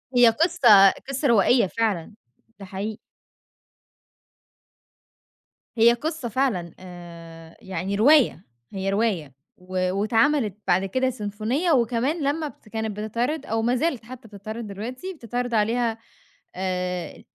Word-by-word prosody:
هي 245 -1 +7
قصة 225 - +6 0.2
قصة 275 +1 -1
روائية 230 -1 +4
فعلًا، 215 -3 -2 0.5
ده 195 - -8
حقيقي. 205 +3 -5 2.8
هي 235 +1 +6
قصة 305 -1 -4
فعلًا 205 - -1
آآ، 170 -2 -12
يعني 190 0 -4
رواية، 255 - +4 0.3
هي 195 0 -2
رواية 195 - -1 0.2
و 185 0 -2
واتعملِت 225 +2 +1
بعد 185 +2 +2
كده 260 +7 0
سيمفونية، 230 - -2
وكمان 255 +5 +1
لمّا 300 +3 -1
بت 240 - -15
كانت 220 -1 -4
بتتعرض 245 +8 -2
أو 225 0 -1
ما 240 +2 +1
زالت 255 -4 -1
حتى 250 -1 -11
بتتعرض 215 +2 -7
دلوقتي، 245 - -6
بتتعرض 245 - -4
عليها 225 +1 +1 0.6
آآ، 180 -1 -3
225 Hz, 120 wpm, -24 LUFS, 195-250 Hz, 2.8 s, هي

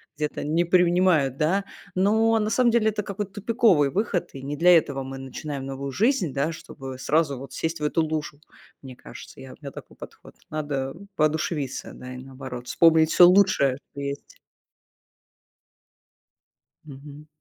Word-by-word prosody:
где-то 150 0 -3
не 165 +3 +1
принимают, 175 -5 +3
да, 190 +6 +1 0.3
но 220 +4 +3
на 210 0 0
самом 240 +1 +3
деле 225 -2 +2
это 210 -1 -3
какой-то 200 -1 -5
тупиковый 205 - +2
выход, 200 -3 -1
и 135 - -8
не 145 +2 -4
для 175 +2 +6
этого 140 -3 -2
мы 135 0 -7
начинаем 135 +1 -6
новую 135 0 -5
жизнь, 210 - +1
да, 150 +4 -1
чтобы 135 -4 -9
сразу 150 -2 +1
вот 135 +2 -10
сесть 160 -1 -3
в - - -3
эту 160 +2 +1
лужу, 155 -2 -4 0.4
мне 130 -2 -10
кажется, - - -12
я, 130 - -10
у - - -14
меня 140 -1 -7
такой - - -12
подход. - - -13
Надо 145 -3 -3 0.2
воодушевиться 155 -2 -1
да 130 0 -9
и - - -8
наоборот, 130 -1 -9
вспомнить 160 -1 +4
всё 175 - +8
лучшее, 180 -9 +4
что 140 - -10
есть. 140 0 -6 2.5
Мгм. 145 +1 -12
155 Hz, 160 wpm, -24 LUFS, 135-185 Hz, 2.5 s, всё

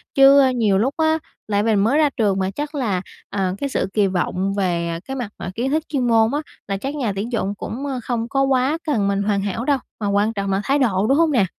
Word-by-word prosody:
Chứ 275 +1 +7 0.2
nhiều 210 -5 +2
lúc 255 +8 +1
á, 320 0 +2 0.3
lại 205 -1 +1
mình 220 -2 +2
mới 265 +7 +2
ra 300 -2 +4
trường 200 -4 +2
mà, 190 0 0
chắc 295 +8 -5
là, 210 -10 0 0.3
à, 190 -2 -1
cái 280 - -3
sự - - -1
kỳ 205 -2 +3
vọng 185 +1 -1
về, 175 -4 0
à, 165 0 -3
cái 270 - -5
mặt 240 -6 -4
mà - - -5
kiến 255 +4 -1
thức 310 0 +1
chuyên 260 -5 0
môn 225 -1 +4
á, 290 - +1 0.3
là 195 - -1
chắc 275 +8 -4
nhà 240 -8 -1
tuyển 215 +5 -3
dụng 200 -3 -1
cũng, 265 +8 -5
a, 265 -3 -3
không 230 -1 -2
có 270 0 +1
quá 270 +3 +2
cần 210 -9 +1
mình 200 0 0
hoàn 200 -1 +1
hảo 205 +4 -3
đâu, 285 -1 +3 0.2
mà 205 - -2
quan 205 +3 +1
trọng 200 -1 -2
là 195 +1 +1
thái 280 +6 +1
độ, 210 -5 +2
đúng 275 - +3
hông 325 -2 +3
nè? 225 -8 +3
225 Hz, 265 wpm, -21 LUFS, 200-270 Hz, 0.3 s, Chứ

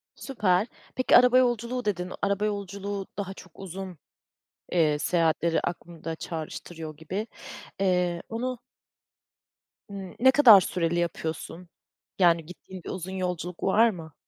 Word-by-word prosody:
Süper! 210 -6 +1 0.3
Peki, 255 - +5
araba 250 +1 +6
yolculuğu, 245 0 +1
dedin; 180 -3 -2
araba 200 +1 +1
yolculuğu 200 -1 -4
daha 195 -1 -4
çok 185 -2 -15
uzun, 190 -1 -7 0.8
eee, 155 -4 +3
seyahatleri 165 0 +1
aklımda 170 -1 -5
çağrıştırıyor 160 -1 -7
gibi, 185 +8 -4 0.5
eee, 180 -2 +1
onu 250 +2 -3 1.3
Hımm. 195 -2 -8
Ne 260 +2 +7
kadar 235 -9 +8
süreli 175 -1 -1
yapıyorsun? 170 +1 -4 0.5
Yani 170 -3 +4
gittiğin 180 +1 -11
bir - - -7
uzun 185 0 -5
yolculuk 180 -2 -4
var 220 +4 +5
mı? 165 -7 -8
185 Hz, 120 wpm, -27 LUFS, 170-205 Hz, 1.3 s, kadar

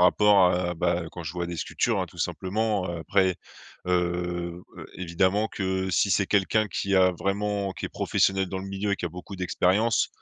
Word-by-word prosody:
rapport 100 +1 +5
à 90 0 0
bah, 85 +1 0
quand 85 - -7
je 80 -2 -5
vois 90 -1 -2
des 85 -1 -5
sculptures, - - 0
hein, - - -2
tout - - -18
simplement, 100 0 -1
heu. 85 - -4
Après, 95 +2 +2 0.5
heu, 90 -1 -1 0.3
évidemment 95 +4 +1
que 95 -1 -2
si 100 +2 +2
c'est 100 +2 +3
quelqu'un 105 +2 +2
qui 100 0 -2
a 95 -1 +5
vraiment, 100 +2 -1
qui - - -6
est - - -2
professionnel 95 0 +1
dans 95 - -4
le 95 - -6
milieu, 100 +1 -1
qui 90 - -6
a 85 - -2
beaucoup 90 +2 -9
d'expérience, 95 +5 +2
95 Hz, 190 wpm, -26 LUFS, 90-100 Hz, 0.5 s, rapport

